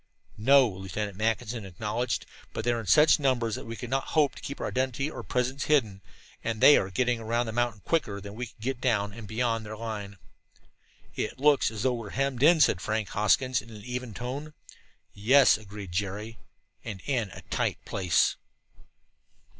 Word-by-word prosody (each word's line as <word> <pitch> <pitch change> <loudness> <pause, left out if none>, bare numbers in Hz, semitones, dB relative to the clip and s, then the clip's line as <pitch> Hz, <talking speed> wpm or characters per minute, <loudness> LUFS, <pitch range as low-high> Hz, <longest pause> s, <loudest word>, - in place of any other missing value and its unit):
"No," 135 +3 +6
Lieutenant 95 +1 -5
Mackinson 110 +2 -1
acknowledged, 105 +6 -3 0.3
"but 110 - -4
they 120 - +3
are 120 - -1
in 110 - -7
such 155 +1 +6
numbers 125 -5 +1
that 125 - -5
we 115 - -5
could 120 +1 -7
not 135 0 0
hope 150 -3 +4
to - - -12
keep 140 - -6
our - - -3
identity 130 +3 -1
or - - -6
presence 130 +3 -1
hidden, 115 -10 +2 0.4
and 115 -1 -2
they 145 - +8
are 95 - +1
getting 125 +3 0
around 115 +2 0
the 110 - -4
mountain 120 -3 -1
quicker 105 -12 0
than 100 0 -9
we 120 +3 -5
could 110 - -20
get 125 +2 -3
down 105 -5 +1
and 110 -1 -9
beyond 115 +1 -1
their 110 0 -7
line." 105 -3 -6 1.0
"It - - -3
looks 145 +1 +4
as 110 -1 -5
though 130 - +2
we 120 - -4
were 110 -3 -7
hemmed 135 -2 0
in," 160 +3 +6
said 95 - +4
Frank 110 -2 -2
Hoskins 125 +5 +2
in 110 - -16
an 105 -2 -11
even 125 -3 -5
tone. 140 +5 -5 0.6
"Yes," 130 +7 +5
agreed 105 -3 -9
Jerry, 105 +4 -4 0.4
"and 105 -4 -6
in 120 -7 0
a - - -11
tight - - 0
place." 90 -4 +1
115 Hz, 190 wpm, -28 LUFS, 105-130 Hz, 1.0 s, they